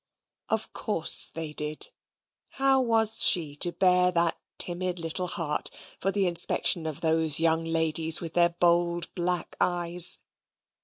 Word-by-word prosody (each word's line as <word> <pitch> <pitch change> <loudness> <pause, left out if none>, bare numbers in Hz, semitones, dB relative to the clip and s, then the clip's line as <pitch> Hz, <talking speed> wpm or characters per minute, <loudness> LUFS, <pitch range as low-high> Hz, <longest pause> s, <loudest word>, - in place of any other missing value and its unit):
Of - - -3
course - - +1
they 160 -2 -6
did. 150 0 -1 0.7
How 270 -1 +2
was 225 -3 +4
she 155 -6 +2
to 175 - +1
bare 180 0 +1
that 170 -1 0 0.2
timid 180 0 0
little 170 +2 -5
heart 160 -4 -1 0.3
for 195 - -2
the 200 -1 0
inspection 170 -1 +2
of 155 -3 -6
those 160 -2 +3
young 165 0 +1
ladies 160 0 0
with 165 -1 -8
their 175 0 +2
bold 170 0 -1
black 175 -1 -3
eyes? 175 0 +2
170 Hz, 140 wpm, -25 LUFS, 160-180 Hz, 0.7 s, was